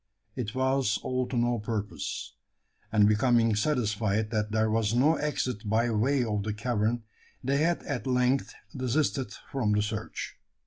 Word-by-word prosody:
It 120 -2 -4
was 130 -4 +2
all 130 -1 -1
to 125 - -3
no 120 0 +2
purpose; 105 -1 -4 0.6
and 105 -2 +5
becoming 115 0 +3
satisfied 110 -3 0
that 105 -2 0
there 110 0 +2
was 110 0 +1
no 140 +6 +5
exit 125 -7 -2
by 115 +2 +2
way 125 +5 +2
of 105 -3 -1
the 105 +1 -3
cavern, 115 0 0 0.4
they 135 +2 +1
had 170 +4 +1
at 135 -1 -3
length 125 +1 +1 0.2
desisted 130 -2 0 0.2
from 115 -6 +1
the 105 0 +2
search. 110 +1 -5
115 Hz, 150 wpm, -28 LUFS, 105-130 Hz, 0.6 s, and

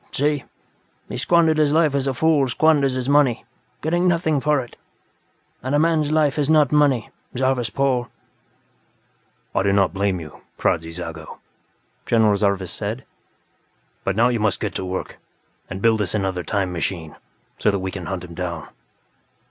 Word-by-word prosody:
See, 145 -1 0 0.6
he - - -5
squandered 165 -2 +3
his 150 -1 +3
life 155 -3 +3
as 140 -1 0
a 135 - 0
fool 150 -2 +2
squanders 145 -1 +3
his 130 -1 -3
money, 140 -5 +3 0.4
getting 175 +3 +1
nothing 165 -4 +2
for 150 0 +2
it. 120 -2 -8 0.9
And 130 +4 -1
a - - +4
man's 155 -1 +2
life 150 -2 +2
is 145 0 +1
not 150 -4 +4
money, 145 -6 +2 0.3
Zarvas 130 -2 +1
Pol." 130 -3 0 1.5
"I - - +2
do 100 0 +2
not 100 -4 +2
blame 100 -2 0
you, 80 -2 -11 0.2
Kradzy 80 0 0
Zago," 80 -1 -8 0.7
General 110 -3 +4
Zarvas 100 -3 0
said. 110 +5 -4 1.0
"But 95 - -1
now 120 +3 +4
you 120 -2 0
must 105 -3 +1
get - - -3
to 95 - -4
work, 95 0 -5 0.5
and 95 +1 -6
build 110 -2 +3
us 105 +1 -1
another 95 -3 -1
'time 95 -2 -1
machine', 85 -2 -3 0.4
so - - +3
that 100 - +1
we 95 0 -4
can 90 -2 -6
hunt 95 -2 -4
him 85 -1 -10
down." 85 -3 -5
120 Hz, 165 wpm, -22 LUFS, 95-145 Hz, 1.5 s, a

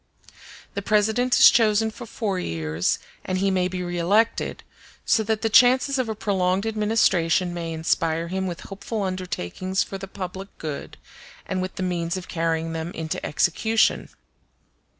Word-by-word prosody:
The 200 - -3
President 220 +5 +2
is - - +9
chosen 220 -1 +3
for 240 +1 -10
four 205 -4 -2
years, 80 - -1 0.3
and 185 - -2
he 195 +1 +1
may 185 -1 +1
be 180 0 -4
reelected; 175 +6 +1 0.4
so 225 - +3
that 220 +1 -1
the - - +3
chances 260 +4 +5
of 250 -3 -1
a 220 - -2
prolonged 190 -2 0
administration 200 -6 +2
may 170 -1 -4
inspire 165 0 0
him 190 +2 -2
with 175 -2 -5
hopeful 200 +2 -5
undertakings 185 - -2
for 195 - -7
the 195 - -7
public 190 0 -6
good, 150 -3 -6 0.5
and 185 - -2
with 185 - -4
the 185 - -3
means 175 -1 -1
of 185 - -7
carrying 165 -1 -1
them 160 +1 -3
into 160 -1 -4
execution. 220 +8 +1
185 Hz, 155 wpm, -24 LUFS, 170-215 Hz, 0.5 s, is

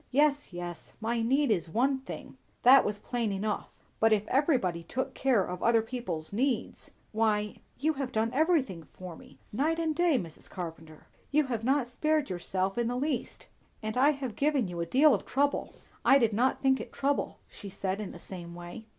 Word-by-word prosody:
"Yes, 290 0 +2
yes, 175 -1 -7
my 230 +1 -1
need 265 +3 +2
is 175 -5 0
one 265 +8 +1
thing; 265 - -9 0.3
that 260 +3 +8
was 210 0 -2
plain 230 0 -2
enough; 205 +2 -2 0.3
but 225 0 +4
if 210 -1 +2
everybody 250 - +2
took 250 +10 -3
care 245 -8 +2
of 180 0 -6
other 230 -1 +4
people's 200 -10 -5
needs 255 +4 -1 0.2
Why, 210 -1 +1 0.2
you 310 +4 +1
have 275 -3 -4
done 220 +1 0
everything 285 - +2
for 180 -2 -8
me, - - -16 0.2
night 305 +8 +1
and 320 -2 0
day, 345 -4 +3
Mrs. 165 -8 -7
Carpenter. 160 -3 -8 0.2
You 300 +2 +3
have 235 -4 -3
not 265 +1 +2
spared 300 +3 0
yourself 185 +3 -2
in 235 - +1
the 245 +1 -1
least; 270 -2 -3 0.4
and 215 0 -3
I 265 +3 +5
have 270 -7 -3
given 280 -6 +1
a 170 0 -2
deal 280 - +5
of - - 0
trouble." 285 +1 0 0.3
"I 275 - +7
did 230 -5 +2
not 250 +7 +1
think 265 -3 +3
it - - -9
trouble," 280 +1 -1
she 200 - -10
said 190 +1 -3
in 205 - -5
the - - -10
same 170 -2 -8
way. 175 +6 -9
235 Hz, 190 wpm, -29 LUFS, 195-275 Hz, 0.4 s, that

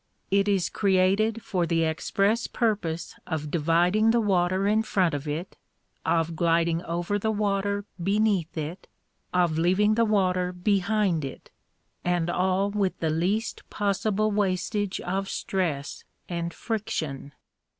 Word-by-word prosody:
It 200 +1 +3
is 195 -3 +2
created 200 +3 +2
for 175 -3 -1
the 165 0 +2
express 195 +7 +1
purpose 200 -8 -1
of 155 -3 -3
dividing 175 +7 +3
the 235 +1 +4
water 190 -2 +1
in 215 +1 +3
front 190 -6 +1
of 145 +1 -4
it, 155 +5 -4 0.5
of 165 0 +1
gliding 165 0 +2
over 175 +4 -1
the 220 - -1
water 205 -1 0 0.2
beneath 195 -3 +1
it, 160 +4 -5 0.4
of 175 -3 +2
leaving 190 +5 +3
the 230 +1 +3
water 185 -4 +1
behind 195 -2 +1
it 135 - -8 0.5
and 175 -1 0
all 190 +3 +1
with 200 -2 -1
the 160 -1 0
least 190 +8 -1
possible 210 +1 0
wastage 200 0 -1
of 195 +2 -2
stress 160 -7 -2 0.2
and 170 -1 -3
friction. 155 - -4
185 Hz, 130 wpm, -26 LUFS, 170-205 Hz, 0.5 s, the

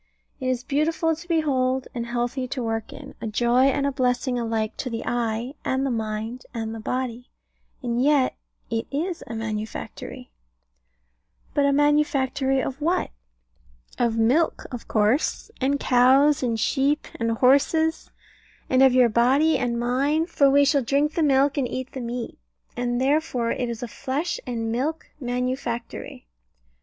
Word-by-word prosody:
It 255 - -3
is 255 -1 0
beautiful 320 +3 +1
to 330 +3 -12
behold, 265 -6 +1
and 235 -1 -4
healthy 245 +2 -2
to 250 0 -4
work 225 -1 -3
in; 285 -1 -10
a - - -3
joy 240 +4 +3
and 275 +1 +2
blessing 250 0 0
alike 225 -2 -2
to 255 - -3
the 230 -1 -4
eye, 235 +1 -1
and 265 +1 0
the 270 - 0
mind, 220 +2 -3
and 225 -1 -3
the 225 - -6
body: 250 +1 -3 0.5
and 240 0 0
yet 285 -2 +3 0.4
it 225 0 -1
is 330 +5 -3
a 230 - -6
manufactory. 215 - -6 1.2
But 285 -1 +3
a - - +3
manufactory 275 -2 +2
of 270 +2 -5
what? 340 +4 0 0.9
Of 235 -2 +1
milk 260 +9 +2
of 245 -2 -7
course, 220 - +1
and 280 +2 +1
cows, 265 +4 +4
and 230 -3 -1
sheep, 280 +5 +1
and 230 -1 +1
horses; 285 +7 +2 0.6
and 260 0 +4
of 265 -1 +6
your 250 -1 +6
body 260 +8 +3
and 235 -2 -1
mine 275 +6 +1
for 285 -5 +3
we 285 +1 +5
shall 280 0 +3
drink 280 +5 +1
the 330 - 0
milk 280 -1 +3
and 260 - 0
eat 260 +1 -5
the 260 - -6
meat. 235 - -5 0.4
And 245 0 -1
therefore 265 -4 +1
it 245 -2 -2
is 235 +1 -5
a - - -3
flesh 280 +8 -3
and 230 -2 -2
milk 290 +7 -2
manufactory. 245 - -4
255 Hz, 155 wpm, -24 LUFS, 235-280 Hz, 1.2 s, of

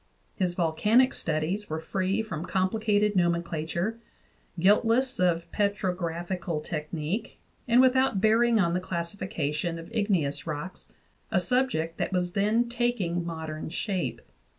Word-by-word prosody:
His 180 -2 0
volcanic 210 +10 +3
studies 165 +6 -2
were 155 +1 -2
free 190 +5 -1
from 180 -6 -5
complicated 210 +2 +1
nomenclature, 170 +3 0 0.6
guiltless 230 +7 +3
of 170 -2 +2
petrographical 180 -4 -1
technique, 160 +8 -4 0.3
and 245 +1 +6
without 260 -4 +3
bearing 225 +2 +4
on 170 -3 +2
the 180 - +1
classification 170 -3 -3
of 165 +7 -10
igneous 190 -10 0
rocks 155 +4 -6 0.4
a - - +3
subject 250 - 0
that - - -1
was 180 -1 0
then 215 +5 +2
taking 235 -8 -1
modern 160 -2 -5
shape. 185 +1 -2
185 Hz, 120 wpm, -27 LUFS, 165-215 Hz, 0.6 s, and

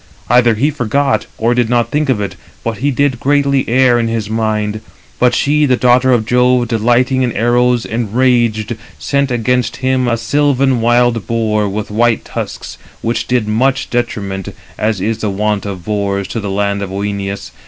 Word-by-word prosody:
Either 120 -2 +4
he 140 +8 +1
forgot, 140 +1 0
320 110 - -4
or 120 - +4
did 120 -2 +1
not 120 -1 +1
think 150 -1 0
of 125 -5 +2
it, 100 -3 -4 0.3
but 115 -2 -3
he 140 +4 +1
did 140 -2 0
greatly 140 -1 +1
err 125 0 +4
in 115 -1 0 0.2
mind. 110 -1 -1 0.4
But 125 -1 +3
she, 150 +1 +2
the 125 -2 +2
daughter 125 +1 +3
of 120 -3 +2
Jove, 125 0 +2
delighting 120 +3 +2
in 125 -2 +1
arrows, 120 +2 +2
enraged, 120 -1 0 0.2
sent 140 0 0
against 125 0 0
[him] 130 -1 0
a 120 -1 +1
sylvan 135 0 +1
wild 120 -1 +2
boar, 110 -3 0
with 105 +1 -4
white 115 +1 +1
tusks, - - -6 0.2
which 115 0 -1
did 125 -4 0
much 130 +5 0
detriment, 100 -6 -3 0.2
as 110 -2 -1
is 110 +3 -1
the 110 - -1
wont 105 +1 -1
[of 95 -4 -7
boars], 100 -2 -1
to 115 - -3
the 100 -2 -4
land 100 +1 -1
of 100 - -4
Œneus. 100 0 -4
120 Hz, 175 wpm, -15 LUFS, 105-125 Hz, 0.4 s, Either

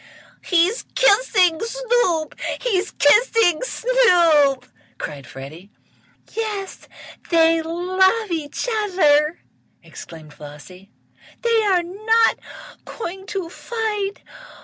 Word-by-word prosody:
"He's 360 +6 +1
kissing 400 -8 +3
Snoop! 460 -8 -1 0.3
He's 405 -5 -1
kissing 420 - +3
Snoop!" 345 - +2 0.3
cried 140 -2 -7
Freddie. 155 +9 -11 0.6
"Yes, 425 -3 -5 0.4
they 330 -1 +3
love 370 +5 0
each 315 +5 -4 0.2
other!" 310 -5 +2 0.4
exclaimed 155 -3 -12
Flossie. 150 +7 -13 0.5
"They 460 -1 +2
are 370 -3 +2
not 435 +6 +1 0.4
going 385 -2 -8
to 380 -3 -4
fight! 420 0 -4
365 Hz, 85 wpm, -20 LUFS, 310-445 Hz, 0.6 s, kissing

